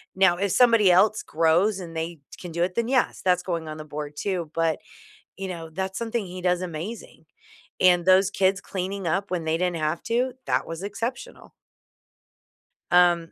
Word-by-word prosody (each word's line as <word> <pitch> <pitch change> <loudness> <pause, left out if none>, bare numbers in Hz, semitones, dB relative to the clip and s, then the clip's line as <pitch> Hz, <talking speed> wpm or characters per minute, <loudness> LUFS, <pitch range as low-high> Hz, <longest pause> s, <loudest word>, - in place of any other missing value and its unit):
Now 190 -2 +4
if 200 0 -1
somebody 230 -5 +5
else 205 +4 +4
grows 170 +6 +2
and 165 -2 -8
they 165 0 -4 0.2
can 175 - -8
do 170 +1 0
it, 180 +1 -2
then, 235 0 0
yes, 260 -1 +1
that's 180 -1 +2
going 170 -3 -3
on 155 - -5
the 155 - -7
board 150 0 -6
too. 180 -4 -2
But, 165 -2 +1 0.6
you 195 0 -4
know, 165 -2 -6
that's 190 +3 -4
something 230 -2 -2
he 180 +1 -8
does 180 0 +1
amazing. 175 0 -7 0.6
And 180 -1 +5
those 190 +1 +5
kids 195 0 +1
cleaning 190 0 -4
up 195 +4 -1
when 175 -3 -2
they 160 +1 0
didn't 180 -1 0
have 155 +1 -1
to, 245 +2 0
that - - 0
was 165 +2 -6
exceptional. 230 - -5 1.4
Um 175 -2 +4
180 Hz, 180 wpm, -25 LUFS, 165-200 Hz, 1.4 s, somebody